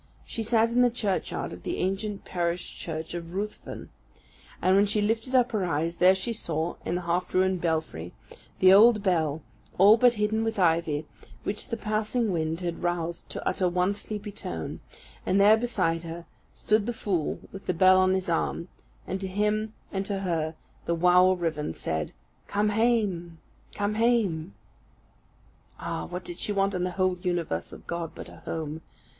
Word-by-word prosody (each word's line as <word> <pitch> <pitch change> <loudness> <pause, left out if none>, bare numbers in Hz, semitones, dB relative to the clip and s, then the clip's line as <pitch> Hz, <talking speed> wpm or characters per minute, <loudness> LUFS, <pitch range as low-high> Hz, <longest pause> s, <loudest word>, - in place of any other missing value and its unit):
She 230 - -5
sat 225 +1 +2
in 245 +1 +3
the 245 - +5
churchyard 210 -5 -2
of - - -10
the 350 - -3
ancient 195 +2 -2
parish 175 0 -2
church 160 -1 -5
of 170 0 -6
Ruthven; 210 +2 -5 0.7
and 185 +1 +3
when 200 +1 +5
she 210 +1 +1
lifted 225 +5 0
up 250 -1 +4
her 215 -4 0
eyes, 165 0 -1
there 185 +1 +6
she 190 +5 -2
saw, 165 -5 -2
in - - -2
the 180 - -1
half 175 +1 -1
ruined 185 -1 +2
belfry, 155 - -2 0.5
the 185 0 +7
old 215 +1 +7
bell, 160 -5 +1 0.3
all 205 +4 +8
but 245 +1 +5
hidden 215 0 0
with 225 -1 -2
ivy, 165 -4 +2 0.4
which 210 +4 -3
the 230 - -2
passing 215 +1 0
wind 160 0 -1
had 170 -2 -3
roused 170 -1 -2
to - - -5
utter 185 -2 +1
one 180 +3 +1
sleepy 210 0 -6
tone; 85 - -5 0.4
and 190 +2 +2
there 205 +2 +7
beside 195 -8 0
her, 170 0 -7 0.3
stood 215 0 +1
the 240 - -1
fool 185 -8 -1
with 195 - -10
the - - +3
bell 185 +2 +6
on 185 0 +4
his 190 -1 -2
arm; 170 +1 -1 0.4
and 190 +1 -4
to 190 - -2
him 210 +3 0 0.2
and 195 -2 -1
to 195 -2 -2
her 165 -4 -1 0.3
the 170 - +1
wow 180 +2 +5
o' 185 0 +4
Rivven 155 - -2
said, 80 -1 -3 0.4
"Come 205 +1 +1
hame, 205 -7 +1 0.4
come 205 0 0
hame!" 210 - +1 1.2
Ah, - - -3
what 180 +1 -6
did 175 0 -7
she - - -1
want 195 0 +1
in 180 -1 -1
the 180 - -2
whole 185 -1 +1
universe 175 - -2
of - - -12
God 170 -2 -4
but - - -8
a - - -13
home? 160 -1 -5
185 Hz, 180 wpm, -27 LUFS, 170-210 Hz, 1.2 s, all